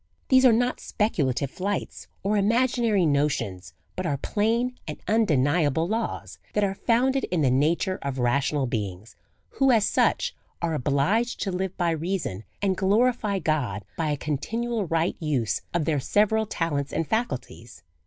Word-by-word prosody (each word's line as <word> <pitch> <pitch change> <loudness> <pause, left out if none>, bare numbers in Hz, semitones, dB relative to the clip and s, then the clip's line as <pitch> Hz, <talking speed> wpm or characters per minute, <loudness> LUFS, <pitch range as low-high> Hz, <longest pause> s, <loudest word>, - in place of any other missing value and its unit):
These 260 0 +6
are - - +6
not 245 +3 +1
speculative 140 - -1
flights 200 +2 -4 0.2
or 205 +2 +1
imaginary 225 -1 +2
notions, 105 - -1 0.2
but - - -2
are 140 - 0
plain 230 - 0
and - - -5
undeniable 160 - +2
laws, 225 +3 -3
that 210 - +1
are 195 -1 +1
founded 255 +6 +1
in 170 -4 0
the 130 - +3
nature 165 +8 +1
of 140 -1 -3
rational 135 +3 +1
beings, 105 -4 -4 0.3
who 270 -1 +2
as 225 -5 +4
such 485 - +1 0.2
are 170 -1 -1
obliged 155 - +1
to 195 - -1
live 185 0 -3
by 175 -2 +1
reason, 160 - -3 0.2
and 195 -2 +2
glority 210 +1 +2
God 125 -12 -1
by 160 -2 -1
a 145 - 0
continual 220 - -2
right 165 +1 0
use 140 -8 -1
of 170 -3 0
their 155 -3 +1
several 215 +8 +2
talents 145 -7 -2
and 165 - -1
faculties. 130 - -4
175 Hz, 155 wpm, -25 LUFS, 140-220 Hz, 0.3 s, These